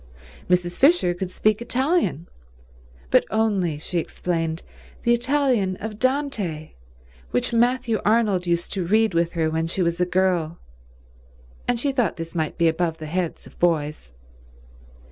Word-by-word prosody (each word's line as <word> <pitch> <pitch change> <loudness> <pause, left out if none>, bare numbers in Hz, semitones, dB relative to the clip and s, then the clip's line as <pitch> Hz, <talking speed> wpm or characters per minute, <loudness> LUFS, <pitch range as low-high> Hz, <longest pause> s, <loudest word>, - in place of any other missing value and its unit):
Mrs. 180 -1 +1
Fisher 275 - +4
could 180 +1 -4
speak 215 +4 +1
Italian, 260 - 0 0.8
but - - +5
only, 200 -8 +1
she 170 +3 -2
explained, 165 -1 -3 0.4
the 235 - +4
Italian 245 -6 +1
of 210 +2 -7
Dante, 240 - -1 0.6
which 125 - -1
Matthew 240 -1 +2
Arnold 210 -4 +2
used 170 0 0
to 190 -3 -1
read 220 +1 +3
with 170 0 +1
her 160 -2 0
when 160 +1 -1
she 185 +2 -1
was 170 +1 -1
a - - +4
girl, 180 -3 +1 1.1
and 245 -1 +1
she 280 +3 0
thought 245 -8 0
this 165 0 -6
might 160 -3 -2
be 170 - +3
above 165 0 0
the 155 - -7
heads 175 +2 -3
of - - -16
boys. 155 - 0
180 Hz, 145 wpm, -23 LUFS, 165-230 Hz, 1.1 s, but